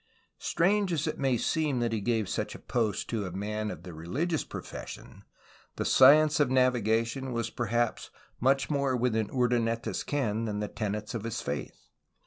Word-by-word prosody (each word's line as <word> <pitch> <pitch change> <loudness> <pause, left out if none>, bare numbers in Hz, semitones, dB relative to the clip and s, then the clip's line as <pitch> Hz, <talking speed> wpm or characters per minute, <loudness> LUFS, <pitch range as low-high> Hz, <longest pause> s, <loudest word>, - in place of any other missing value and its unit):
Strange 195 +2 +2
as 155 -3 0
it 155 - -3
may 135 -3 +2
seem 150 -1 0
that 120 -1 0
he 110 -2 -1
gave 110 -1 0
such - - -3
a - - -6
post 110 -5 -1
to 110 -5 -2
a - - -6
man 105 +3 -3
of - - -7
the 90 - -8
religious 140 - -2
profession, - - -9 0.5
the - - -2
science 150 +3 +6
of 145 -4 +3
navigation 125 0 +1
was 115 -1 -2
per 120 - -2
haps 120 +1 0 0.3
much 135 +2 +2
more 140 -3 +1
within 110 -3 0
Urdaneta's 120 -2 0
ken 115 -6 -1
than 105 -2 -2
the 105 - -2
tenets 105 -1 -4
of 115 - -3
his 115 0 -3
faith. 70 +1 -6
120 Hz, 175 wpm, -29 LUFS, 110-135 Hz, 0.5 s, science